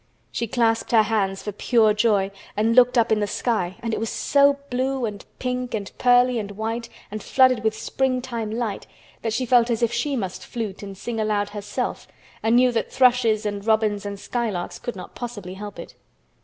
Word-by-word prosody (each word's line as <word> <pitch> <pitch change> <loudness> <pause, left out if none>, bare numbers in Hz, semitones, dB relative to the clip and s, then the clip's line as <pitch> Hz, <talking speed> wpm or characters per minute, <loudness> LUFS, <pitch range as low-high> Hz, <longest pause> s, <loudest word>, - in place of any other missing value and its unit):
She 235 - -2
clasped 230 0 +1
her 220 -2 +7
hands 195 -3 -1
for 210 - -3
pure 220 +1 +3
joy 210 -2 +2 0.3
and 225 +2 +2
looked 250 0 +6
up 230 -1 +3
in 215 - +3
the 205 - 0
sky 195 -5 -1
and 230 -1 -2
it - - -1
was 225 0 -2
so 280 0 +3
blue 260 0 0
and 205 -2 -5
pink 250 -1 -2
and 200 -2 -5
pearly 245 -1 +4
and 205 -2 -5
white 225 +3 -4 0.2
and 215 0 -5
flooded 255 -3 +3
with 220 0 0
springtime 250 -4 -1
light 220 -2 -3 0.3
that 225 - -2
she 255 +4 -1
felt 245 -1 +4
as 235 0 0
if 235 0 +1
she 275 +4 0
must 190 -7 -4
flute 220 -5 -5
and 195 -2 -8
sing 225 +3 -4
aloud 210 -1 0
herself 205 -1 -4 0.3
and 225 +1 +3
knew 250 0 +5
that 230 -2 -2
thrushes 245 -4 +3
and 205 0 -3
robins 215 -2 +2
and 200 -1 -5
skylarks 220 -8 -3
could 240 - -5
not 185 - -9
possibly 210 -7 -6
help 205 +1 -8
it. - - -9
225 Hz, 195 wpm, -23 LUFS, 210-245 Hz, 0.3 s, her